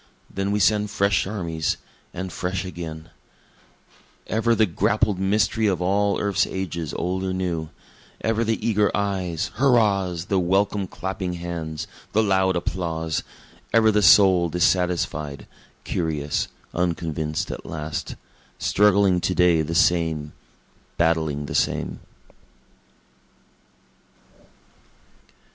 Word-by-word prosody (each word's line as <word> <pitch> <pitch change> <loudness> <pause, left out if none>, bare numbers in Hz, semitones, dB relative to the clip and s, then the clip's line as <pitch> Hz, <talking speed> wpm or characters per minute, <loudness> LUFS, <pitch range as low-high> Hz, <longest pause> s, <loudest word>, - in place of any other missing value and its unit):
then 100 +1 -1
we 105 - +1
send 105 0 +3
fresh 100 -2 +1
armies 85 -6 -2 0.3
and 95 +1 -6
fresh 95 +1 -3
again;) 80 -3 -7 1.1
Ever 115 +1 +1
the 110 0 +4
grappled 100 +2 +1
mystery 105 +3 +1
of 95 -4 +1
all 100 +3 +1
earth's 100 -2 +1
ages 85 -5 -4
old 95 +2 -2
or 95 -1 -1
new; 85 -4 -2 0.5
Ever 115 +1 +1
the 115 0 0
eager 105 -2 +3
eyes, 95 -5 -2
hurrahs, 100 -10 +2
the 95 -1 +1
welcome 95 +2 +1
clapping 95 0 -4
hands, 85 -3 -5 0.3
the 110 - +3
loud 95 -2 +2
applause; 80 -2 -2 0.5
Ever 110 0 +5
the 105 0 +2
soul 90 -2 +6
dissatisfied, 85 -4 0 0.4
curious, 75 -4 -1 0.3
unconvinced 80 -3 -2
at - - -7
last; 75 0 -5 0.4
Struggling 100 -3 +3
to 90 - 0
day 90 -2 +4
the 80 +2 -3
same 80 -3 +2 0.6
battling 80 -3 +1
the - - -6
same. - - -1
90 Hz, 110 wpm, -23 LUFS, 80-100 Hz, 1.1 s, soul